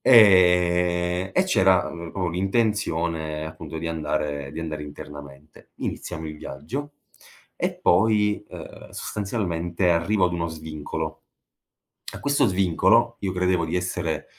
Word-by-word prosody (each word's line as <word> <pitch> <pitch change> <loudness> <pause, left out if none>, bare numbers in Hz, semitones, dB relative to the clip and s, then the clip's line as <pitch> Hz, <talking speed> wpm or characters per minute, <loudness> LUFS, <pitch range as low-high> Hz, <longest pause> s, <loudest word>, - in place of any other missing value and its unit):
ehm, 90 -4 +5
e 185 - +4
c'era, 95 - +3
mhmm, 85 -1 -7
proprio 90 -3 -1
l'intenzione 85 -6 0
appunto 80 0 -8
di 85 - -4
andare 75 -3 -2
di 80 - -5
andare 80 -2 -4
internamente. 75 0 -11
Iniziamo 80 -2 -5
il 75 0 -7
viaggio, 125 - -6 0.6
e - - -1
poi, 105 +2 +3
uhm, - - -10
sostanzialmente, 90 -4 -1
arrivo 90 +4 +2
ad 90 - -3
uno 85 -1 -1
svincolo. 80 0 -5 0.9
A - - -7
questo 145 -2 +2
svincolo 95 +5 +3
io 95 -2 -2
credevo 90 -1 +1
di 80 +2 -3
essere, 90 -3 -2
90 Hz, 125 wpm, -24 LUFS, 80-95 Hz, 0.9 s, ehm